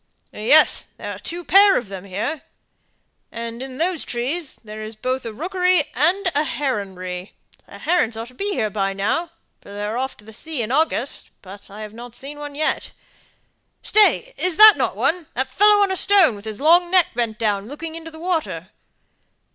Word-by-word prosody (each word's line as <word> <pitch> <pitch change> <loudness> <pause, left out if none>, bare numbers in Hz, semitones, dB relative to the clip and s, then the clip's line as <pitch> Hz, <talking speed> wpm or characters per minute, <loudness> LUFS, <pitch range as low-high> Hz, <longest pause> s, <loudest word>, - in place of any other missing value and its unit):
"Yes; 270 +9 +4
there - - -6
are - - -11
two 345 +1 -6
pair 395 +2 +6
of 240 - -3
them 195 -1 -8
here. 210 +11 -4 0.9
And 230 +1 -6
in 260 -1 -7
those 340 0 0
trees 270 +7 -2
there's 215 0 -9
both 255 +2 -3
a - - -5
rookery 360 - +1
and 345 +10 +2
a 290 - +2
heronry; 195 -11 -4 0.4
the - - -11
herons 300 -11 0
ought 230 +1 -6
to - - -17
be 400 +10 -3
here 215 - -1
by 195 -1 -1
now, 220 - -1 0.3
for - - -16
they're 210 +3 -3
off 265 0 -4
to 210 - -17
the 220 - -12
sea 290 +2 -4
in 220 - -5
August, 310 +4 0
but 200 +2 -12
I've 210 +1 -9
not 240 +1 -10
seen 285 +3 -8
one 290 -1 -7
yet. 310 +1 -2 0.9
Stay! 440 +3 +3
isn't 360 -3 -1 0.2
that - - -1
one 340 -2 0
that 260 +2 0
fellow 415 0 +5
on 395 - 0
a - - 0
stone, 375 - +5
with 200 +1 -12
his 215 -1 -6
long 345 +4 +4
neck 365 -2 +4
bent 230 -2 -2
down, 205 -2 -1
looking 315 +4 -7
into 325 0 -8
the 320 - -13
water?" 320 - -3
265 Hz, 185 wpm, -21 LUFS, 215-335 Hz, 0.9 s, pair